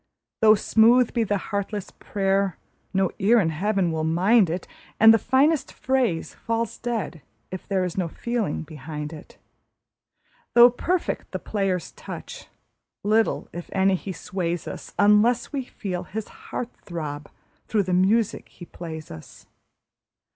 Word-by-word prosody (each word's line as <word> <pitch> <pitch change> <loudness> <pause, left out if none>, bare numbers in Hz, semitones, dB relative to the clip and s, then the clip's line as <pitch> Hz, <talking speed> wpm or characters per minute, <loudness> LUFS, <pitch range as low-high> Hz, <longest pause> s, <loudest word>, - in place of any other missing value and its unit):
Though 215 -1 +7
smooth 230 +3 +4
be 235 - +2
the 205 -1 0
heartless 200 +1 -4
prayer, 195 -2 -1 0.3
no 190 -2 +1
ear 220 +4 +5
in 165 -6 +1
Heaven 190 +2 0
will 160 -1 -2
mind 185 +5 +4
it, 175 +2 -4 0.3
And 225 +1 +9
the 225 - +4
finest 275 +6 +2
phrase 250 -11 0
falls 230 0 -3
dead 225 -9 -3 0.3
if 185 - -7
there 195 -2 +1
is 180 +1 -3
no 180 - 0
feeling 230 -1 -2
behind 150 0 -7
it. 155 - -12 1.2
Though 240 +1 +9
perfect 350 +8 -2
the - - 0
player's 195 -4 -2
touch, - - -9 0.6
little, 220 +2 +1
if 175 0 -7
any, 195 0 +3
he 190 +1 -3
sways 175 -1 -3
us, - - -7
Unless 210 +6 +4
we 270 -3 -2
feel 180 -7 -5
his 215 +3 -5 0.2
heart 245 - -3
throb 150 -5 -6 0.4
through 210 -2 +1
the 185 -1 -2
music 205 +4 +2
he 175 - -12
plays 160 -3 -8
us. 80 - -12
195 Hz, 145 wpm, -24 LUFS, 175-225 Hz, 1.2 s, And